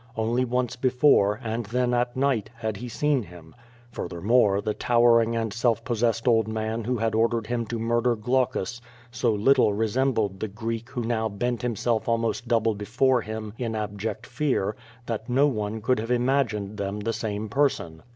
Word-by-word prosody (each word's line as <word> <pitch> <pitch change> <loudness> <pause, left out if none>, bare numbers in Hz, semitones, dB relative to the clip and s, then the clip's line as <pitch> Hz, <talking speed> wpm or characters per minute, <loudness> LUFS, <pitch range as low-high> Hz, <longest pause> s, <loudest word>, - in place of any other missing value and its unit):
Only 115 +3 +1
once 125 0 -1
before, 125 -5 +3
and 115 -1 -3
then 125 +2 0
at 120 0 0
night, 130 -6 +1
had 110 -3 -3
he 125 +4 -6
seen 145 +2 +1
him. 85 -5 -13 0.4
Fur - - -4
thermore, 100 +3 +2
the 105 +1 -2
towering 115 -1 +3
and 115 -2 -2
self 115 -1 0
possessed 115 0 0
old 115 -2 +4
man 110 +1 -2
who 125 +1 0
had 115 0 0
ordered 115 0 +1
him 120 0 -2
to 115 - -3
murder 120 +1 +1
Glaucus 120 0 -1 0.3
so 120 -1 +1
little 110 +1 +3
resembled 110 -2 0
the 110 - -2
Greek 115 +3 -5
who 125 -3 -4
now 110 -1 0
bent 120 +4 -2
himself 120 -1 -1
almost 115 +1 0
double 115 -1 +2
before 120 +5 +1
him 110 -1 -6
in 115 -3 -2
abject 105 +2 -4
fear, 120 -6 -1 0.3
that 115 -1 -4
no 135 +4 +4
one 110 -5 -2
could 125 +2 +1
have 115 +2 -4
imagined 120 -5 0
them 100 +1 -3
the 115 +2 -1
same 105 -1 -3
person. 105 - 0
115 Hz, 175 wpm, -25 LUFS, 110-120 Hz, 0.4 s, old